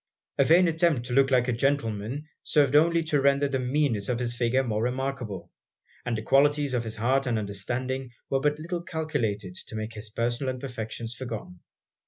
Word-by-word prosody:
A - - +7
vain 175 +5 +6
attempt 160 -6 +2
to 125 - -4
look 135 +1 +4
like 125 -2 +3
a - - +2
gentleman, 120 0 -1 0.2
served 145 -2 +2
only 165 +2 +5
to 150 -3 +1
render 140 +1 +3
the 135 -1 -1
meanness 130 -5 0
of 125 - +1
his 120 -1 -2
figure 120 +2 +2
more 110 -4 -1
remarkable; 125 -5 -3 0.6
and 115 -2 0
the 110 - -5
qualities 145 +2 +3
of 120 -2 0
his 110 - -4
heart 130 +4 +1
and 120 -2 +1
understanding 120 +6 -3 0.2
were 135 - +1
but 150 +2 +1
little 170 +3 -4
calculated 145 - -2
to 100 - -8
make 110 +1 -4
his 105 0 -7
personal 120 +4 -1
imperfections 115 -3 -5
forgotten. 115 -8 -7
130 Hz, 185 wpm, -27 LUFS, 115-145 Hz, 0.6 s, A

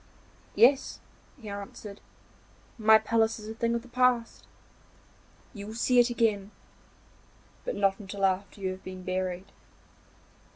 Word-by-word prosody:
'Yes,' 265 +4 +4 0.4
he 225 - -11
answered, 205 0 -8 0.8
'my 220 0 +7
palace 225 0 +1
is 215 -1 -10
a 220 - -5
thing 230 +1 0
of 235 - -3
the - - -14
past; 250 -1 +1 1.1
you 205 -3 -8
will 220 - -7
see 245 +1 +3
it 240 0 +5
again, 215 -5 0 1.2
but - - -2
not 195 0 +1
until 195 -1 -2
after 195 +1 -1
you 190 -1 -1
have 185 0 -9
been 185 0 -8
buried. 185 +1 -3
215 Hz, 135 wpm, -28 LUFS, 195-235 Hz, 1.2 s, my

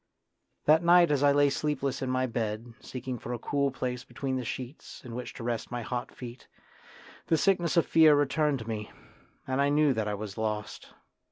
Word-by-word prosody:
That 155 +2 +6
night 175 -1 +6
as 145 -2 +2
I 145 0 +5
lay 145 0 +4
sleepless 140 -2 -1
in 130 - -2
my 130 0 +1
bed, 115 -1 -3
seeking 130 -1 -6
for 120 - -5
a - - -2
cool 140 +4 0
place 125 -1 -4
between 135 -2 -4
the 130 - -2
sheets 130 +4 -7
in 120 - -8
which 125 +1 -5
to - - -7
rest 120 -1 -2
my 120 -1 -4
hot 120 +2 -3
feet, 125 0 -10 0.8
the 160 - +3
sickness 175 -2 +2
of 170 - +5
fear 160 -2 +6
returned 145 0 +2
to 110 -3 -9
me, 105 -2 -4 0.6
and 130 +1 0
I 140 - +3
knew 145 -1 +4
that 110 -3 -2
I 105 - -1
was 105 +1 -7
lost. 105 -1 -3
130 Hz, 200 wpm, -29 LUFS, 120-145 Hz, 0.8 s, That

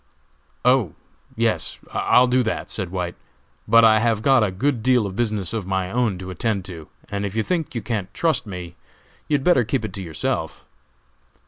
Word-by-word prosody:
"Oh, 125 - +3 0.4
yes, - - 0 0.2
I'll 125 - +4
do 125 +1 +2
that," 110 -2 -3
said 95 -5 -3
White, 90 -1 -3 0.5
"but 115 0 +7
I 110 -1 +6
have 110 -1 +1
got 135 -3 +5
a 105 - +1
good 120 +6 -1
deal 125 -1 +3
of 95 -1 -5
business 105 -5 -1
of 105 -5 -3
my 95 -1 -1
own 115 -5 0
to 95 0 -7
attend 100 +1 -2
to, 85 -5 -9 0.2
and 100 0 -3
if 100 0 -4
you 110 - +1
think 165 -4 -2
you 115 - -3
can't 105 -4 -3
trust 155 -9 0
me, 90 -3 -7 0.5
you 150 - +2
had 140 - -1
better 155 -7 +4
keep 120 +1 -1
it 100 - -6
to 100 - -6
yourself." 80 -2 -3
110 Hz, 195 wpm, -22 LUFS, 95-125 Hz, 0.5 s, but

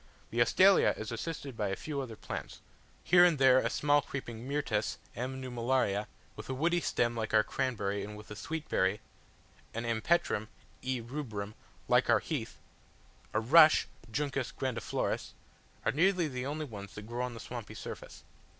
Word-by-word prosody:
The 120 - +1
Astelia 190 +11 +5
is 110 - -5
assisted 140 +2 -5
by 105 -2 -1
a 95 - -1
few 145 +3 -4
other 120 -4 -6
plants, - - -7 0.4
here 175 0 +7
and 175 -4 +5
there 130 -1 +6
a - - 0
small 145 0 +3
creeping 125 -3 -6
Myrtus 140 -7 -1 0.2
(M. 130 +2 -4
nummularia), 120 -5 0 0.3
with 110 +3 -9
a 130 - -1
woody 170 +5 +2
stem 120 -6 +1
like 110 -1 -1
our 110 - +6
cranberry 105 -7 -1
and 105 +1 -7
with 105 - -12
a - - -5
sweet 160 +7 -5
berry, - - +1 0.8
an 115 +1 -2
Empetrum 115 -1 +1 0.3
(E. 130 -1 -2
rubrum), 115 -5 -5 0.3
like - - +3
our - - +7
heath, - - -4 0.7
a 110 - +1
rush 155 +7 +7 0.2
(Juncus 135 +1 -1
grandiflorus), 130 -3 -2 0.5
are - - +3
nearly 180 +2 +3
the 130 -2 -4
only 155 +2 -3
ones 100 -6 -9
that 105 - -7
grow 120 +2 -3
on 125 -1 -4
the - - -8
swampy 120 -3 -7
surface. - - -8
125 Hz, 170 wpm, -32 LUFS, 110-145 Hz, 0.8 s, here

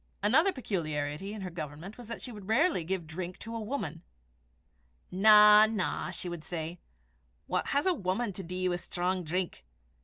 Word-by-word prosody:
Another 315 - +5
peculiarity 160 - -3
in 215 -1 -6
her 185 -1 -5
government 160 +4 -7
was 245 -3 -11
that 230 - -7
she 250 - -6
would 205 -4 -10
rarely 255 - +2
give 180 0 -3
drink 175 +3 -6
to 230 0 -7
a - - -2
woman. 210 - -4 1.1
"Na, 210 +2 +8
na," 215 -4 -2
she - - -5
would 175 -2 -6
say, 165 0 -5 0.7
"what - - -1
has 285 +1 +1
a 375 - +4
wuman 200 - -2
to 195 - -6
dee 185 +1 -3
wi' 175 -1 0
strong 180 +1 -2
drink! 175 - -3
185 Hz, 175 wpm, -30 LUFS, 175-220 Hz, 1.1 s, Na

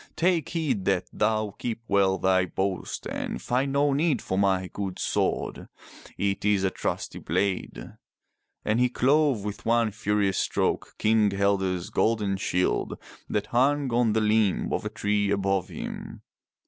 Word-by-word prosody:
Take 170 -3 +1
heed 135 - -1
that 95 -2 +1
thou 110 -1 0
keep 115 -2 -3
well 95 -1 +3
thy 95 0 +2
boast 95 +1 -3
and - - -4
find 130 +3 0
no 140 0 +3
need 145 -3 +2
for 95 - -3
my 95 -1 +2
good 95 -1 -5
sword. - - -1 0.5
It 100 0 -1
is 105 -2 +2
a 95 - +1
trusty - - -3
blade." 100 -2 -2 0.7
And 110 +2 +1
he 125 0 +3
clove 135 -2 +2
with 105 -1 -5
one 115 -1 +2
furious 105 -3 0
stroke - - -1
King 110 -1 +3
Helge's 95 -2 0
golden 105 -4 +1
shield 90 -1 0 0.3
that 105 - -1
hung 135 +1 +2
on 120 -2 +3
the 110 - +2
limb 105 -2 +2
of - - -2
a - - -1
tree 105 0 0
above 95 -2 0
him. - - -7
105 Hz, 150 wpm, -26 LUFS, 95-120 Hz, 0.7 s, well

